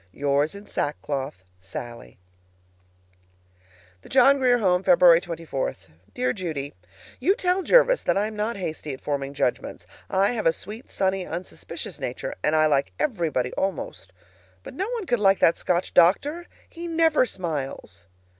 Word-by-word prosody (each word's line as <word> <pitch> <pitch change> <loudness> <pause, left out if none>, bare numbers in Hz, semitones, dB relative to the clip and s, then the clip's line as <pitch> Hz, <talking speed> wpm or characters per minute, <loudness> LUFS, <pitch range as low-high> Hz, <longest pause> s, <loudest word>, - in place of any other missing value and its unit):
Yours 145 - 0
in 200 +1 -10
sackcloth, 140 - -3 0.2
SALLIE. 95 - -9 1.8
THE - - -16
JOHN 270 +2 +5
GRIER 250 -2 +4
HOME, 185 -5 +2
February 175 -2 +6
24. 165 -6 -4 0.4
Dear 125 0 0
Judy: 150 -5 -4 0.5
You 370 +10 +3
tell 365 0 +1
Jervis - - +4
that - - +1
I 205 - +2
am 215 0 -5
not 215 +3 -2
hasty 155 -6 -5
at - - -17
forming 140 -1 -3
judgments. 125 - -2 0.2
I 195 +3 +2
have 225 -7 -1
a 165 - +4
sweet, 215 +9 -9
sunny, 190 -1 0
unsuspicious 175 +3 -7
nature, - - -4
and 155 - +2
I 155 0 +4
like 140 -3 +1
everybody, 165 - -1
almost. 170 - -4 0.5
But - - -9
no 385 - -3
one 470 -5 -3
could 245 -7 0
like 195 -1 +4
that 165 - +3
Scotch 180 0 -1
doctor. 295 - +3 0.2
He 340 0 -8
NEVER 325 -5 +3
smiles. 140 - -5
180 Hz, 150 wpm, -24 LUFS, -, 1.8 s, February